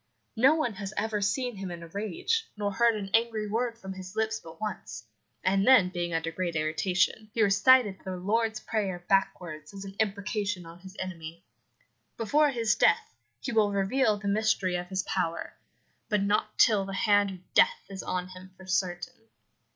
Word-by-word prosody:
No 265 +7 +5
one 275 -8 -1
has 195 +1 -7
ever 210 0 -1
seen 240 +3 -1
him 190 -1 -5
in 170 -1 -7
a - - -9
rage, 215 - -2
nor 205 -1 -1
heard 235 +2 +3
an 195 -2 -5
angry 225 -2 +1
word 230 +2 -1
from 190 -4 -7
his 185 -1 -9
lips 220 0 0
but 165 0 -12
once, 215 -1 -5 0.4
and 195 +3 +2
then 240 -9 +7
being 175 -1 -3
under 165 0 -1
great 170 0 -3
irritation, 180 +7 0
he 225 - +3
recited 205 +1 +5
the 185 -1 -5
Lord's 220 +4 0
Prayer 195 -6 -3
backwards 175 -4 -1
as 195 0 -7
an 195 - -8
imprecation 205 -2 -1
on 165 +1 -12
his 190 +1 -12
enemy. 170 -2 -7 0.7
Before 290 +7 +3
his 230 -5 +1
death 170 - +2 0.3
he - - -3
will 215 -2 +3
reveal 205 +3 +2
the 205 0 -6
mystery 200 -3 +1
of 175 0 -3
his 190 0 -1
power, 170 -4 -2 0.6
but 210 -3 +2
not 210 +1 0
till 210 -4 +5
the 195 0 -5
hand 205 0 +3
of 185 -1 -12
death - - +4
is 195 -1 -7
on 180 0 -3
him 185 0 -11
for 190 - -13
certain.'" 185 +3 -2
200 Hz, 180 wpm, -28 LUFS, 185-220 Hz, 0.7 s, then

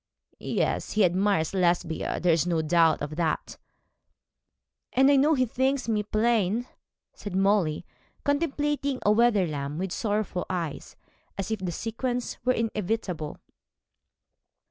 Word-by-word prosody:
'Yes, - - -1
he 215 -2 +4
admires 185 -2 +1
Lesbia. 175 -3 0
There 175 -2 +3
is 165 +2 +1
no 165 -2 +1
doubt 165 0 +3
of 150 +1 -5
that.' 165 -3 -2 1.3
'And 270 +2 +5
I - - +5
know 295 +3 +4
he 255 -2 +2
thinks 260 +2 0
me 215 -2 +1
plain,' 215 +1 +1 0.5
said 205 -3 -7
Molly, 190 -5 +2 0.4
contemplating 285 -2 0
Wetherlam 190 -10 +2
with 185 +1 -3
sorrowful 205 -3 -2
eyes, 170 -5 -4 0.4
as 195 +2 -3
if 220 - -1
the 185 -2 -3
sequence 240 +6 -3
were 255 +1 +3
inevitable. 210 -8 -2
205 Hz, 120 wpm, -27 LUFS, 175-240 Hz, 1.3 s, And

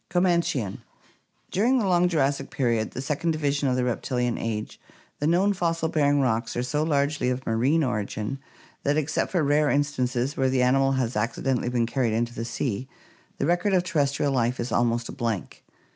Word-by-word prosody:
Comanchian. 170 - +1 0.3
— - - -41
During 240 +7 +3
the 225 - +1
long 180 -1 +3
Jurassic 140 -4 0
period, 120 -10 0
the 130 - -6
second 150 +4 -1
division 145 -2 0
of 125 - +1
the 125 - +1
reptilian 125 0 -1
age, 110 -2 -4 0.4
the 145 - 0
known 185 +5 +3
fossil 165 -3 -1
bearing 145 -2 +2
rocks 115 -2 0
are 120 - -1
so 125 +4 -1
largely 145 -3 +1
of 125 +1 -3
marine 130 +8 +2
origin 105 +1 -3 0.4
that, 145 +1 +1
except 155 0 -1
for 175 -4 +1
rare 145 +1 +3
instances 135 -2 0
where 130 0 +1
the 130 -1 +2
animal 135 +2 +3
has 130 -3 -1
accidentally 120 +3 -1
been 120 -1 +1
carried 120 -2 0
into 120 +1 -1
the 115 -1 -4
sea, 125 +1 -3 0.5
the - - -1
record 175 +5 +2
of 180 - +3
terrestrial 145 -5 0
life 125 0 0
is 120 - -3
almost 120 0 +1
a - - -6
blank. 115 -7 -4
135 Hz, 185 wpm, -25 LUFS, 120-155 Hz, 0.5 s, During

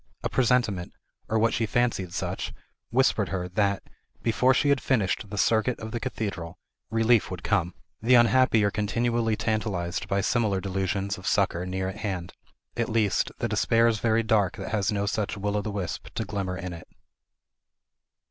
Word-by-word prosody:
A - - 0
presentiment, 120 -8 +1 0.4
or 110 - +1
what 115 +1 +3
she 115 - 0
fancied 115 -6 0
such, - - -3 0.4
whispered 115 -5 +2
her, 90 -2 -2
that, 100 +1 0 0.4
before 120 +3 +3
she 145 +2 +2
had 140 -3 +3
finished 110 -4 0
the 105 - -6
circuit 110 +4 +2
of 110 0 -6
the 120 - -2
cathedral, 95 -9 -4 0.3
relief 115 0 +3
would 90 -2 -6
come. 90 -4 0 0.3
The 125 +3 +5
unhappy 120 -2 +5
are 100 - +2
continually 115 +2 0
tantalized 105 -6 -2
by 100 0 +1
similar 105 -3 +1
delusions 95 +1 -2
of 95 - -8
succor 90 +1 +1
near 95 0 -2
at 95 +2 -5
hand; 95 -5 -4 0.4
at 115 -1 -1
least, 110 -3 +1
the - - -1
despair 115 0 +3
is 110 -2 +1
very 115 +1 +2
dark 105 -4 +2
that - - -5
has 105 0 +1
no 100 -1 0
such 105 0 -2
will 100 +1 -2
o' 105 - +1
the 105 - -4
wisp 100 -4 -4
to 110 - -2
glimmer 95 -2 -3
in 90 0 -5
it. 85 - -10
105 Hz, 175 wpm, -26 LUFS, 95-115 Hz, 0.4 s, The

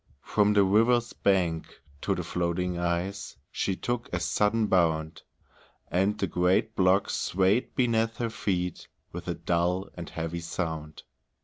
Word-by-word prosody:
From 105 0 +2
the 100 -1 +5
river's 115 +5 +3
bank 90 -5 0 0.2
to 100 - 0
the 90 - -3
floating 90 +1 -1
ice 85 +3 -2 0.2
She 95 - -1
took 120 +4 -3
a - - -1
sudden 110 +2 +1
bound, 80 -5 +1 0.7
And 95 +4 +2
the - - 0
great 90 +1 +1
block 95 +1 +3
swayed 95 +6 +1
beneath 115 -2 +1
her 115 -2 -2
feet 90 -5 -2 0.2
With - - -7
a - - -1
dull 90 +2 0
and 85 -1 -7
heavy 85 +1 -4
sound. 80 -2 -4
95 Hz, 140 wpm, -28 LUFS, 85-105 Hz, 0.7 s, the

